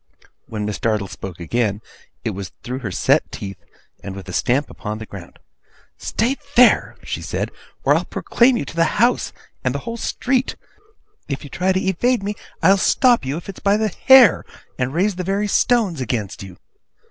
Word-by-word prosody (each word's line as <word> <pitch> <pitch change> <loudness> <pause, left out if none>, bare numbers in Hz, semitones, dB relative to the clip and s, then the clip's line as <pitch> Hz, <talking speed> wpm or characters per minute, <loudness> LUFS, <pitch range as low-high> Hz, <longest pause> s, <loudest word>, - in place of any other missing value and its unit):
When 105 -2 -4
Miss 105 -2 -3
Dartle 105 -3 0
spoke 95 -2 -8
again, 105 +3 -1 0.5
it - - 0
was 95 -1 -7
through 125 +2 -4
her 120 -7 -4
set 90 - +2
teeth, 95 -1 -7 0.4
and 95 - -6
with 95 -1 -9
a 90 - -7
stamp 130 +9 +1
upon 105 -2 -5
the 110 - -7
ground. 95 -5 -11 0.6
'Stay 245 +5 -1 0.2
there!' 250 0 +5
she - - -4
said, - - -3 0.3
'or - - +4
I'll - - +1
proclaim 240 +1 +2
you - - -3
to - - -9
the 165 -1 +1
house, 240 +3 +3 0.3
and - - 0
the - - -5
whole 230 0 -4
street! 255 +2 -1 0.7
If 140 - -4
you 145 - -10
try 185 +1 +1
to 185 - +1
evade 230 +4 +1
me, 205 +1 -2 0.3
I'll 190 +4 +6
stop 245 - +3
you, 135 +4 -2
if 170 - -9
it's 195 - -8
by 200 +1 +3
the 215 0 +1
hair, 260 -1 +6 0.3
and 125 +1 -1
raise 185 +5 0
the 185 - -2
very 200 +3 0
stones 205 - +2
against 110 -4 -3
you! 95 -2 -10
165 Hz, 190 wpm, -21 LUFS, -, 0.7 s, I'll